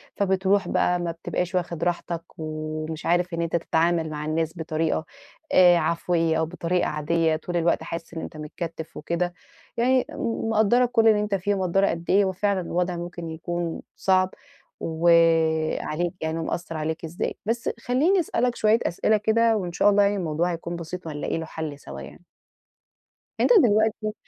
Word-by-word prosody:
فبتروح 195 0 +1
بقى 180 0 +1
ما 170 -1 -2
بتبقاش 180 +2 -3
واخد 170 -2 -2
راحتك، 170 -1 -2
ومش 155 0 -5
عارف 175 0 +1
إن 170 - -1
أنت 170 0 -1
تتعامل 165 0 +1
مع 150 0 -5
الناس 160 +1 -1
بطريقة 160 0 -1 0.5
آآ 175 -1 +7
عفويَّة 165 0 +1
أو 160 - +1
بطريقة 180 +1 -1
عادية، 160 +1 +1
طول 175 +2 -3
الوقت 170 -1 +1
حاسس 165 0 -6
إن 160 - -4
أنت 155 - -8
متكتِّف 160 +1 -6
وكده. 175 +1 -2 0.4
يعني 255 +2 +3
م 230 -6 -3
مقدَّرة 225 +3 +4
كُلّ 230 -2 +3
اللي 215 -1 +5
أنت 210 -1 0
فيه، 200 +2 0
ومقدَّرة 190 +1 +2
قد 170 0 -4
إيه 200 +1 +5
هو 190 - 0
فعلًا 195 0 0
الوضع 175 +1 -1
ممكن 175 -1 -6
يكون 170 +1 -4
صعب، 185 -1 +2 0.5
و 165 +1 -2 0.7
عليك 175 +3 -2
يعني 160 +1 -2
ومأثَّر 165 0 -4
عليك 160 +1 -3
إزاي. 165 +2 -3
بس 230 +1 -1
خلّيني 300 +12 +2
أسألك 250 -6 0
شوية 220 +2 +3
أسئلة 215 +5 +2
كده، 225 +1 +3
وإن 180 -3 -3
شاء 205 - +3
الله 205 0 +4
يعني 200 +1 +2
الموضوع 170 -1 -1
هيكون 170 +1 -5
بسيط، 170 +1 -7
وهنلاقي 150 +1 -3
له 160 - -4
حَلّ 155 -3 -6
سوا 70 - -9
يعني. 65 - -12 1.2
أنت - - +3
دلوقتي 215 -1 +2
175 Hz, 170 wpm, -25 LUFS, 160-200 Hz, 1.2 s, آآ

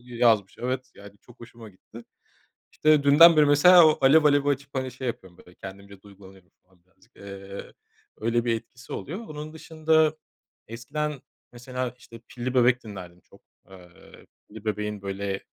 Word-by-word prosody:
yazmış, 115 -5 +1
evet 130 +1 -4
yani 100 0 -15
çok 120 0 -20
hoşuma 115 -1 -13
gitti. 110 +4 -15 0.7
İşte 155 -2 +3
dünden 165 +4 +7
beri 150 -1 +5
mesela 165 +4 +7
o 155 - +2
"Alev 150 +4 +5
Alev"i 145 -1 +3
açıp 140 0 -3
hani 130 -1 -3
şey 130 - -7
yapıyorum 95 -6 -8
böyle 90 - -18
kendimce 100 0 -12
duygulanıyorum 95 -2 -17
falan 90 -1 -32
birazcık. 95 - -31
Eee, 100 0 -10 0.5
öyle 115 +1 0
bir 115 -1 +1
etkisi 125 +2 -13
oluyor. 175 +8 -6
Onun 155 -7 -9
dışında 160 -1 0 0.5
eskiden 140 +5 -5 0.3
mesela 125 0 -6
işte 115 -2 -14
Pilli 125 +1 -5
Bebek 125 0 +3
dinlerdim 90 -4 -10
çok, - - -23 0.3
eee, 90 -2 -17 0.2
Pilli 110 0 -13
Bebek'in 105 -1 -4
böyle 100 0 -4
120 Hz, 155 wpm, -25 LUFS, 100-145 Hz, 0.7 s, dünden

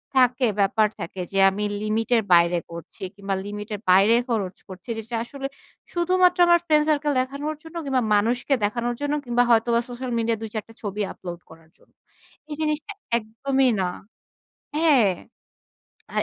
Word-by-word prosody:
থাকে, 255 0 +4
ব্যাপার 210 +2 +3
থাকে 170 +3 -7
যে 195 - 0
আমি 200 +2 -4 0.2
লিমিট 215 +1 -1
এর 225 - +2
বাইরে 170 0 +5
করছি 170 0 -10
কিংবা 200 -1 -3
লিমিট 205 +1 -6
এর - - -8
বাইরে 195 +5 +6
খরচ 200 -6 -1
করছি। 190 +4 -12
যেটা 225 +2 -5
আসলে 275 +3 -6 0.5
শুধুমাত্র 360 +1 +3
আমার 345 0 +6
ফ্রেন্ড 305 -2 +4
সার্কেল 295 -1 +2
দেখানোর 280 +4 -4
জন্য 325 +1 -13
কিংবা 265 -2 +1
মানুষকে 240 +7 +1
দেখানোর 235 +3 -2
জন্য 290 0 -1
কিংবা 240 0 +2
হয়তোবা 235 0 +4
সোশ্যাল 245 +1 -5
মিডিয়া 230 0 0
২ 225 - -5
৪ 215 -2 -3
টা 225 - -15
ছবি 205 0 -3
আপলোড 175 -2 -8
করার 160 0 -17
জন্য, - - -28 0.6
এই - - -3
জিনিসটা 305 +4 -2 0.3
একদমই 255 +4 0
না 185 - +1 0.9
হ্যাঁ। 280 - +4 1.0
আর - - +2
230 Hz, 165 wpm, -24 LUFS, 205-275 Hz, 1.0 s, বাইরে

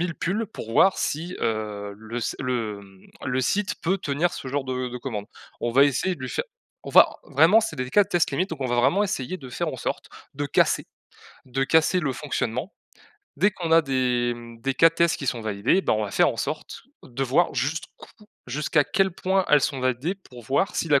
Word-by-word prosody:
pulls, 205 +6 -1
pour 115 - -8
voir 190 - +5
si, 170 +5 -3
heu, 105 -2 -3
le 110 +2 -7
s 115 - -2
le, 115 -6 -2
mmh, 95 -1 -18 0.2
le 130 0 0
site 195 - 0
peut 185 +4 +1
tenir 165 +1 -1
ce 130 - -6
genre 140 0 -2
de 130 -1 -3
de 125 - -6
commande. 115 -5 -5 0.4
On 120 - -1
va 140 +4 +6
essayer 145 +7 0
de - - -18
lui 130 - -4
faire - - -2 0.4
on - - -7
va - - +6
vraiment 160 +10 +5
c'est 160 - -3
des 125 - -1
l 125 - -8
cas 205 - +6
de - - -19
test 175 -4 +2
limite 185 +8 0
donc, 165 - -6
on - - 0
va 120 - 0
vraiment 135 +12 +3
essayer 185 -2 -3
de 130 -5 -10
faire 120 - -3
en - - -5
sorte - - -4 0.2
de 145 - -3
casser 140 - +2 0.6
de 135 +1 -1
casser 160 +5 +3
le 140 -6 -1
fonctionnement. 125 - -3 0.7
Dès 205 +2 +3
qu'on 170 -3 -4
a 165 - +8
des, 125 -3 0
mmh, 115 -1 -12
des 135 +2 -1
cas 165 - +7
de - - -24
tests 170 -1 +3
qui 140 - -6
sont 120 -1 -1
validés, 110 - +1
ben, - - +1
on 110 0 0
va 100 - -5
faire - - +4
en - - -3
sorte - - -4 0.2
de 130 +2 -4
voir 145 +7 +2
jusqu'où 160 - -5 0.2
jusqu'à 150 0 +1
quel 190 +6 +1
point 190 +1 +1
elles 150 -1 +6
sont 135 -4 -1
validées, 130 +8 0
pour 125 -11 -14
voir 140 - 0
si 165 - -1
la 140 -2 +5
135 Hz, 230 wpm, -25 LUFS, 120-170 Hz, 0.7 s, a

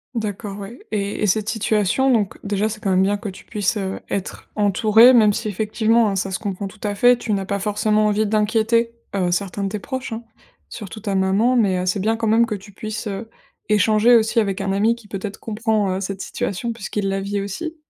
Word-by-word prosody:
D'accord. 205 -2 -4
Ouais 205 +5 -9
et 205 -1 -2
et 210 - +2
cette 215 +3 +1
situation, 220 +4 +1
donc 210 -5 0
déjà, 205 +1 0
c'est 215 0 -6
quand 195 - 0
même 185 0 +3
bien 205 +1 +1
que 205 -1 -6
tu 190 - -12
puisses, 210 0 -1
heu, 190 -1 -3
être 195 -1 -5
entouré 215 +4 +5
même 215 -4 +5
si 220 - -3
effectivement, 220 +2 +2
hein, 195 - -2
ça 190 0 -2
se 185 - -2
comprend 200 -1 -4
tout 205 +2 -14
à 205 -1 -1
fait, 245 +2 +5
tu 225 - -4
n'as 195 -1 -1
pas 200 0 -2
forcément 210 +1 +1
envie 210 +1 +1
d'inquiéter, 220 +2 +1 0.2
heu, 180 -2 +1
certains 200 +2 -2
de 195 - -1
tes 210 - -3
proches, 260 +2 -5
hein, 225 +1 -6 0.5
surtout 215 0 -8
ta 205 -2 -3
maman. 195 +6 +2
Mais 200 -6 +3
heu, 180 - -2
c'est 185 +2 0
bien 220 +3 +1
quand 230 - -2
même 230 +2 +4
que 215 - -2
tu 200 +1 -11
puisses, 215 +3 -6
heu, 210 +2 -5 0.4
échanger 215 +3 +4
aussi 225 0 +3
avec 195 -2 -1
un 195 0 -1
ami 215 +4 +2
qui, 235 -3 -16
peut-être, 200 0 -6
comprend, 220 -2 0
heu, 195 - -4
cette 195 0 -4
situation 230 +5 -3
puisqu'il 205 -2 -3
la 195 0 -1
vit 200 +1 -2
aussi. 315 - -5
210 Hz, 230 wpm, -21 LUFS, 195-225 Hz, 0.5 s, entouré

